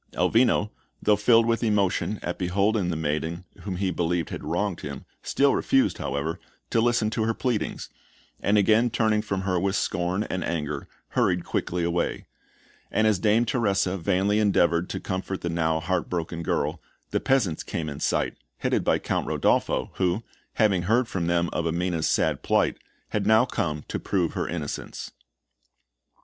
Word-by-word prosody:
Elvino, 110 Hz, -2 st, +3 dB, 0.3 s
though 105 Hz, -, +4 dB
filled 115 Hz, +2 st, +4 dB
with 115 Hz, +1 st, +1 dB
emotion 105 Hz, -1 st, +1 dB
at 90 Hz, -, -3 dB
beholding 100 Hz, +2 st, +1 dB
the 85 Hz, -, -1 dB
maiden 80 Hz, +3 st, -2 dB, 0.2 s
whom 95 Hz, -3 st, -4 dB
he 95 Hz, 0 st, 0 dB
believed 85 Hz, -1 st, -1 dB
had -, -, -5 dB
wronged 90 Hz, +4 st, -1 dB
him, 70 Hz, -2 st, -7 dB, 0.2 s
still 140 Hz, 0 st, +2 dB
refused, 135 Hz, -, +2 dB
however, 70 Hz, +5 st, -2 dB, 0.3 s
to 115 Hz, -, +3 dB
listen 115 Hz, -2 st, +2 dB
to 115 Hz, -, -1 dB
her 115 Hz, 0 st, 0 dB
pleadings, 125 Hz, -5 st, -2 dB, 0.5 s
and 105 Hz, +1 st, +2 dB
again 110 Hz, +4 st, +4 dB
turning 110 Hz, -2 st, +2 dB
from 100 Hz, -3 st, -2 dB
her 95 Hz, -2 st, 0 dB
with 95 Hz, +2 st, 0 dB
scorn 90 Hz, +1 st, 0 dB
and 95 Hz, -4 st, -3 dB
anger, 75 Hz, -4 st, -3 dB, 0.2 s
hurried 90 Hz, -1 st, +1 dB
quickly 90 Hz, 0 st, -1 dB
away; 85 Hz, 0 st, -1 dB, 0.6 s
and 110 Hz, -, +2 dB
as 105 Hz, -4 st, +3 dB
Dame 110 Hz, +3 st, +3 dB
Teresa 100 Hz, -6 st, +1 dB
vainly 100 Hz, +3 st, +1 dB
endeavoured 90 Hz, -4 st, +2 dB
to -, -, -3 dB
comfort 95 Hz, 0 st, -4 dB
the 85 Hz, -, -2 dB
now 80 Hz, -1 st, +1 dB
heart 90 Hz, +2 st, -1 dB
broken 85 Hz, -1 st, -3 dB
girl, -, -, -1 dB, 0.3 s
the -, -, +1 dB
peasants 110 Hz, -12 st, +1 dB
came 80 Hz, -2 st, -4 dB
in 70 Hz, -1 st, -5 dB
sight, -, -, 0 dB, 0.2 s
headed -, -, 0 dB
by -, -, +3 dB
Count -, -, -2 dB
Rodolpho, 65 Hz, -, +1 dB
who, 95 Hz, +4 st, +1 dB, 0.3 s
having 100 Hz, -5 st, +3 dB
heard 115 Hz, +7 st, +2 dB
from 90 Hz, -7 st, -2 dB
them 85 Hz, 0 st, +2 dB
of 85 Hz, -, -1 dB
Amina's 85 Hz, 0 st, 0 dB
sad -, -, +1 dB
plight, -, -, +1 dB, 0.3 s
had 105 Hz, -1 st, -1 dB
now 110 Hz, +3 st, +6 dB
come 75 Hz, -10 st, -2 dB
to -, -, -2 dB
prove 90 Hz, -4 st, 0 dB
her -, -, -2 dB
innocence. 80 Hz, -4 st, -5 dB
95 Hz, 165 wpm, -26 LUFS, 85-110 Hz, 0.6 s, now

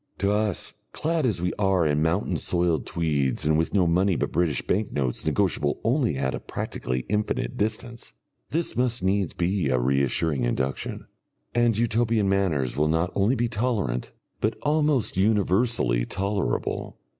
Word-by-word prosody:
To 100 Hz, 0 st, +1 dB
us, 105 Hz, -2 st, 0 dB, 0.2 s
clad 160 Hz, -3 st, 0 dB
as 90 Hz, -7 st, -1 dB
we 90 Hz, -, 0 dB
are 95 Hz, -4 st, +2 dB
in 75 Hz, 0 st, +1 dB
mountain 85 Hz, +3 st, +1 dB
soiled 85 Hz, -1 st, 0 dB
tweeds 75 Hz, -6 st, 0 dB
and 75 Hz, 0 st, +3 dB
with 80 Hz, +1 st, +1 dB
no 95 Hz, -3 st, +3 dB
money 90 Hz, +3 st, +2 dB
but -, -, -1 dB
British 85 Hz, -6 st, 0 dB
bank 105 Hz, +2 st, 0 dB
notes 65 Hz, -4 st, -1 dB
negotiable 75 Hz, 0 st, +1 dB
only 115 Hz, -, +1 dB
at 65 Hz, 0 st, -1 dB
a -, -, -3 dB
practically 65 Hz, 0 st, -4 dB
infinite 105 Hz, -, -1 dB
distance, 115 Hz, +3 st, -3 dB, 0.4 s
this 165 Hz, +2 st, -1 dB
must 125 Hz, -4 st, 0 dB
needs 95 Hz, -1 st, 0 dB
be 90 Hz, -3 st, 0 dB
a 65 Hz, -, +2 dB
reassuring 70 Hz, +2 st, +1 dB
induction. 65 Hz, +3 st, -2 dB, 0.5 s
And 120 Hz, -2 st, +2 dB
Utopian 115 Hz, -2 st, +1 dB
manners 85 Hz, -10 st, +1 dB
will 75 Hz, +1 st, +2 dB
not 80 Hz, +3 st, +1 dB
only 105 Hz, +6 st, +2 dB
be 120 Hz, -1 st, +1 dB
tolerant, 105 Hz, -, -1 dB, 0.3 s
but 110 Hz, +1 st, 0 dB
almost 150 Hz, -8 st, +1 dB
universally 100 Hz, -, +2 dB
tolerable. 100 Hz, +7 st, -2 dB
95 Hz, 155 wpm, -25 LUFS, 75-110 Hz, 0.5 s, and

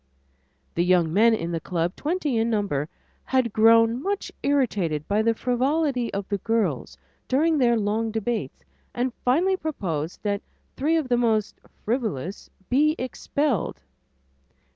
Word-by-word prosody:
The 170 Hz, -, +1 dB
young 175 Hz, -3 st, +3 dB
men 225 Hz, +4 st, +5 dB
in 170 Hz, -5 st, -4 dB
the 165 Hz, -, -1 dB
club, 170 Hz, +1 st, -2 dB
twenty 305 Hz, -4 st, -1 dB
in 225 Hz, +1 st, +1 dB
number, 195 Hz, -10 st, -1 dB, 0.4 s
had 255 Hz, -4 st, +1 dB
grown 230 Hz, +2 st, +5 dB
much 400 Hz, +3 st, -2 dB
irritated 205 Hz, -, 0 dB
by 205 Hz, +2 st, +2 dB
the 230 Hz, +1 st, +2 dB
frivolity 255 Hz, +1 st, 0 dB
of 200 Hz, -1 st, -4 dB
the 200 Hz, -1 st, -2 dB
girls 180 Hz, -, -1 dB, 0.3 s
during 310 Hz, +4 st, +2 dB
their 235 Hz, -2 st, +4 dB
long 220 Hz, +2 st, 0 dB
debates, 225 Hz, +1 st, -3 dB, 0.3 s
and 250 Hz, +1 st, 0 dB
had -, -, -42 dB
finally 350 Hz, +10 st, +2 dB
proposed 175 Hz, -, -4 dB
that 205 Hz, -1 st, -1 dB, 0.3 s
three 305 Hz, +5 st, +1 dB
of 310 Hz, -5 st, -1 dB
the 245 Hz, -1 st, +2 dB
most 220 Hz, -3 st, 0 dB, 0.3 s
"frivolous" 210 Hz, -, -3 dB, 0.2 s
be 300 Hz, +4 st, +3 dB
expelled. 260 Hz, -, -2 dB
230 Hz, 140 wpm, -25 LUFS, 200-260 Hz, 0.4 s, men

